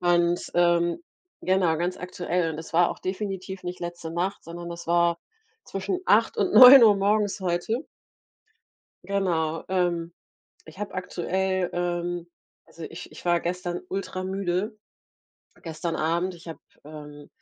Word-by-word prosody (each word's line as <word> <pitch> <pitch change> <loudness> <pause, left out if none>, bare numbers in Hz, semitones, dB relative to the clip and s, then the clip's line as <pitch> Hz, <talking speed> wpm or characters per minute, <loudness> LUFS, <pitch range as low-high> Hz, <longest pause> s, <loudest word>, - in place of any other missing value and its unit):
und 175 0 +2
ähm, 175 0 +3 0.4
genau, 185 -3 +2
ganz 175 +3 -2
aktuell. 180 -1 -2
Und 155 - -7
es 160 - -9
war 170 +1 +4
auch - - -7
definitiv 190 -1 -4
nicht 180 0 -5
letzte 175 -1 -6
Nacht, 180 +4 -2
sondern 170 +1 -8
das 170 0 -8
war 170 0 +2 0.5
zwischen 195 - -3
8:00 - - +3
und 365 - 0
9:00 250 -5 +10
morgens 205 +1 +1
heute. 185 - -1 1.2
Genau, 165 -5 -1
ähm, 175 -2 0 0.5
ich 160 +4 -14
habe 210 - -5
aktuell 185 0 -1
ähm, 175 0 -2 0.4
also 165 - -10
ich 170 +2 -9
ich - - -13
war 175 -1 +2
gestern 175 0 -3
ultra-müde 190 +2 -3 0.8
gestern 165 0 -4
Abend. 170 +4 0
Ich 170 0 -13
habe, 165 - -7 0.3
ähm, 150 -1 -11
175 Hz, 135 wpm, -25 LUFS, 170-190 Hz, 1.2 s, 9:00